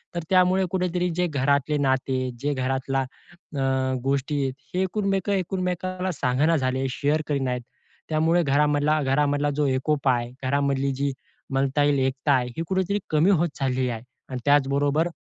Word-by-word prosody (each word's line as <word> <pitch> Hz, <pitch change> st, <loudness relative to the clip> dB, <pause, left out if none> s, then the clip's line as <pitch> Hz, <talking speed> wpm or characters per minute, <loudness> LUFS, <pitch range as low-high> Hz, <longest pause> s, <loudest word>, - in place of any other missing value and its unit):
तर 170 Hz, -, -1 dB
त्यामुळे 185 Hz, 0 st, +4 dB
कुठेतरी 180 Hz, -1 st, 0 dB
जे 180 Hz, 0 st, +1 dB
घरातले 140 Hz, 0 st, +1 dB
नाते, 130 Hz, -1 st, +1 dB, 0.2 s
जे 145 Hz, +3 st, -1 dB
घरातलला 135 Hz, 0 st, -1 dB, 0.6 s
अ, 130 Hz, -1 st, +1 dB
गोष्टी, 140 Hz, +1 st, 0 dB, 0.3 s
हे 185 Hz, -, +2 dB, 0.5 s
एकुमेकांना 185 Hz, 0 st, -2 dB
सांगेना 145 Hz, +3 st, +1 dB
झालेत, 130 Hz, 0 st, 0 dB
शेअर 145 Hz, +4 st, 0 dB
करत 145 Hz, -2 st, 0 dB
नाहीत. 125 Hz, -2 st, -1 dB, 0.5 s
त्यामुळे 160 Hz, +2 st, +3 dB
घरामधला 150 Hz, +1 st, +2 dB
घरामधला 145 Hz, +2 st, +1 dB
जो 150 Hz, -, +1 dB
एकोपा 135 Hz, +1 st, +1 dB
आहे 120 Hz, -1 st, -2 dB
घरामधली 140 Hz, 0 st, +1 dB
जी 140 Hz, +1 st, -1 dB, 0.4 s
म्हणता 135 Hz, +2 st, +1 dB
येईल 145 Hz, -1 st, +3 dB
एकता 135 Hz, +2 st, -1 dB
आहे, 125 Hz, -2 st, +2 dB
ही 165 Hz, -, -1 dB
कुठेतरी 190 Hz, +2 st, 0 dB
कमी 155 Hz, +4 st, +3 dB
होत 170 Hz, -2 st, +2 dB
चाललेली 130 Hz, -1 st, 0 dB
आहे. 115 Hz, -2 st, -4 dB, 0.3 s
आणि 130 Hz, -1 st, -4 dB
त्याचबरोबर 145 Hz, +2 st, +3 dB
145 Hz, 145 wpm, -25 LUFS, 135-160 Hz, 0.6 s, त्यामुळे